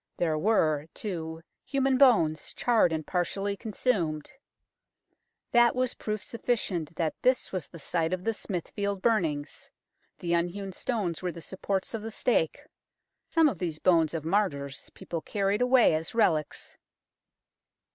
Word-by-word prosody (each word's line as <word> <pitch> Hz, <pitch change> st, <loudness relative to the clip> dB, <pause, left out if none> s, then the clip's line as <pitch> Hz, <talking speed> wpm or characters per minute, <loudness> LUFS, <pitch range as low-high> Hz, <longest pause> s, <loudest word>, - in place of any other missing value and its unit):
There 160 Hz, -3 st, +1 dB
were, 155 Hz, -6 st, +2 dB
too, 165 Hz, -5 st, -5 dB, 0.2 s
human 270 Hz, -1 st, +1 dB
bones, 165 Hz, -, +4 dB
charred 230 Hz, -8 st, +3 dB
and 155 Hz, -1 st, -2 dB
partially 195 Hz, +3 st, -1 dB
consumed. 195 Hz, -, -1 dB, 1.2 s
That 240 Hz, 0 st, +5 dB
was 255 Hz, -1 st, 0 dB
proof 215 Hz, -1 st, -4 dB
sufficient 190 Hz, -9 st, -2 dB
that 160 Hz, -1 st, 0 dB
this 255 Hz, 0 st, +2 dB
was 180 Hz, -7 st, -3 dB
the 170 Hz, -, -12 dB
site 165 Hz, +1 st, -1 dB
of 185 Hz, 0 st, -2 dB
the 225 Hz, -, 0 dB
Smithfield 200 Hz, 0 st, -3 dB
burnings. 160 Hz, -11 st, 0 dB, 0.5 s
The 170 Hz, -1 st, -2 dB
unhewn 175 Hz, +3 st, -1 dB
stones 190 Hz, -5 st, -2 dB
were 180 Hz, -1 st, -2 dB
the 170 Hz, -, -9 dB
supports 190 Hz, +4 st, -3 dB
of 225 Hz, -, -3 dB
the 225 Hz, -, -5 dB
stake. 220 Hz, -7 st, 0 dB, 0.7 s
Some 325 Hz, -1 st, +5 dB
of 210 Hz, -, -2 dB
these 165 Hz, -4 st, -2 dB
bones 165 Hz, -2 st, +3 dB
of 155 Hz, -2 st, -4 dB
martyrs 150 Hz, -7 st, -1 dB
people 165 Hz, -2 st, -5 dB
carried 200 Hz, +5 st, 0 dB
away 250 Hz, -6 st, +5 dB
as 160 Hz, +6 st, -3 dB
relics. 160 Hz, -9 st, 0 dB
185 Hz, 140 wpm, -28 LUFS, 160-220 Hz, 1.2 s, That